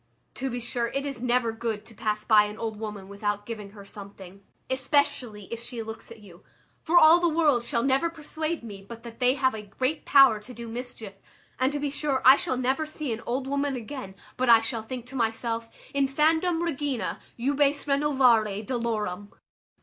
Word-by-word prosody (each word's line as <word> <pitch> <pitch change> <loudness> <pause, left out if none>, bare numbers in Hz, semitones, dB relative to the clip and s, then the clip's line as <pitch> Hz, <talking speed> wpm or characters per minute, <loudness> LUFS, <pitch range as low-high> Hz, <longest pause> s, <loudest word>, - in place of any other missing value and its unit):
To 265 0 -3
be 245 0 -3
sure 235 0 -2
it 275 +4 -3
is 275 -4 -5
never 245 -2 +1
good 225 -2 -4
to 230 - -14
pass 215 0 -2
by 215 -1 +5
an 210 +1 -7
old 220 -2 -4
woman 210 -3 -6
without 205 +1 -3
giving 215 -3 -7
her 200 -2 -12
something, 195 -1 -12 0.2
especially 260 -5 0
if 230 - -4
she 235 -1 -6
looks 220 +1 -9
at 230 -2 -12
you; 180 -4 -15 0.4
for 345 +2 +2
all 330 +1 +8
the 345 -1 +2
world 305 -7 +2
shall 235 -2 0
never 275 +5 +2
persuade 315 -1 -4
me 205 -4 -8
but 230 +3 -11
that 230 -1 -10
they 250 +1 +4
have 260 -2 +2
a 220 - -5
great 255 +9 -2
power 270 -6 +6
to 245 +4 -11
do 235 0 -7
mischief, 230 -3 -7 0.5
and 260 +2 +2
to 290 - -2
be 285 -1 -2
sure 280 -2 -1
I 260 +1 +10
shall 260 - -1
never 265 +5 0
see 300 -5 -4
an 225 - -6
old 260 +2 -1
woman 280 0 -1
again, 245 -4 -7 0.2
but 255 -1 +1
I 230 -1 +9
shall 225 0 -2
think 245 +2 -7
to 260 +2 -11
myself, 230 -1 -1 0.2
_Infandum, 315 +5 +2
regina, 290 -6 -2 0.2
jubes 285 +3 +1
renovare 255 -8 +3
dolorem. 215 -5 -3
245 Hz, 195 wpm, -26 LUFS, 220-275 Hz, 0.5 s, I